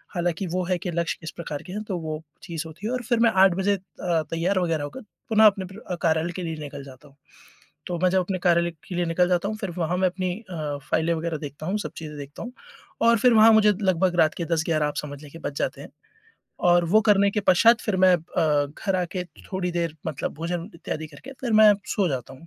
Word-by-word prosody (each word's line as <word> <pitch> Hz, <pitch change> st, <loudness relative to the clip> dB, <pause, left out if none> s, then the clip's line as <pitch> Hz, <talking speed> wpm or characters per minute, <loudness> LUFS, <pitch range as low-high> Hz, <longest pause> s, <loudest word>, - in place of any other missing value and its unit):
हालाँकि 175 Hz, +1 st, -1 dB
वो 185 Hz, 0 st, 0 dB
है 180 Hz, 0 st, 0 dB
कि 180 Hz, -, -4 dB
लक्ष्य 170 Hz, 0 st, -1 dB
किस 160 Hz, -, -6 dB
प्रकार 150 Hz, -4 st, -6 dB
के 185 Hz, -, -7 dB
हैं 210 Hz, -, -3 dB
तो 195 Hz, -4 st, -3 dB
वो 155 Hz, -1 st, -5 dB, 0.2 s
चीज़ 165 Hz, -4 st, -4 dB
होती 165 Hz, +7 st, -7 dB
है 240 Hz, -, -2 dB
और 255 Hz, -, -1 dB
फिर 240 Hz, 0 st, +1 dB
मैं 230 Hz, -1 st, +5 dB
8 190 Hz, -2 st, +5 dB
बजे 195 Hz, +2 st, +1 dB
अ, -, -, -8 dB, 0.5 s
तैयार 175 Hz, +4 st, +1 dB
वगैरह 165 Hz, -4 st, 0 dB
होकर 145 Hz, -, -7 dB, 0.3 s
पुनः 220 Hz, -1 st, +5 dB
अपने 195 Hz, -2 st, +4 dB, 0.4 s
कार्यालय 165 Hz, 0 st, +1 dB
के 185 Hz, -, -4 dB
लिए 165 Hz, -1 st, -3 dB
निकल 140 Hz, -1 st, -7 dB
जाता 135 Hz, +1 st, -14 dB
हूँ। 135 Hz, -, -25 dB, 0.7 s
तो 175 Hz, -, -2 dB
मैं 185 Hz, -, +5 dB
जब 190 Hz, -, +3 dB
अपने 185 Hz, +1 st, -2 dB
कार्यालय 170 Hz, 0 st, +3 dB, 0.2 s
के 180 Hz, -, -5 dB
लिए 175 Hz, 0 st, 0 dB
निकल 175 Hz, +2 st, +2 dB
जाता 180 Hz, +1 st, +1 dB
हूँ 215 Hz, -, -4 dB
फिर 195 Hz, -5 st, -4 dB
वहाँ 175 Hz, +1 st, 0 dB
मैं 185 Hz, 0 st, +3 dB
अपनी 180 Hz, 0 st, -3 dB, 0.2 s
अ, 150 Hz, -4 st, -3 dB
फाइलें 160 Hz, +1 st, +2 dB
वगैरह 165 Hz, 0 st, -2 dB
देखता 145 Hz, 0 st, -8 dB
हूँ, 190 Hz, +5 st, 0 dB
सब -, -, -5 dB
चीज़ें 150 Hz, -2 st, -7 dB
देखता 145 Hz, 0 st, -8 dB
हूँ 245 Hz, +2 st, -8 dB, 0.5 s
और 230 Hz, 0 st, +5 dB
फिर 250 Hz, +2 st, +5 dB
वहाँ 220 Hz, 0 st, +7 dB
मुझे 215 Hz, -1 st, +6 dB
लगभग 185 Hz, -2 st, +2 dB
रात 155 Hz, -1 st, +4 dB
के 170 Hz, -, -3 dB
10-11 160 Hz, -2 st, +1 dB
आप 150 Hz, -, -5 dB
समझ 145 Hz, -1 st, -5 dB
लीजिए 150 Hz, +3 st, -12 dB
बज 140 Hz, -, -14 dB
जाते -, -, -2 dB
हैं -, -, -10 dB, 0.8 s
और 175 Hz, 0 st, +5 dB
वो 215 Hz, +3 st, +6 dB
करने 200 Hz, -1 st, +5 dB
के 210 Hz, -, -1 dB
पश्चात 225 Hz, +4 st, +5 dB
फिर 210 Hz, -4 st, -1 dB
मैं 185 Hz, -1 st, +7 dB
अ, 155 Hz, -3 st, 0 dB
घर 185 Hz, +7 st, -3 dB
आकर 180 Hz, 0 st, -2 dB, 0.3 s
थोड़ी 185 Hz, -1 st, -1 dB
देर 170 Hz, -2 st, -2 dB
मतलब 150 Hz, -4 st, -3 dB
भोजन 170 Hz, +4 st, -4 dB
इत्यादि 160 Hz, -1 st, -5 dB
करके 155 Hz, -, -12 dB
फिर 245 Hz, -3 st, -2 dB
मैं 215 Hz, -1 st, +8 dB
सो 195 Hz, -3 st, 0 dB
जाता 130 Hz, -5 st, -4 dB
हूँ। 160 Hz, +5 st, -15 dB
175 Hz, 240 wpm, -25 LUFS, 160-195 Hz, 0.8 s, मैं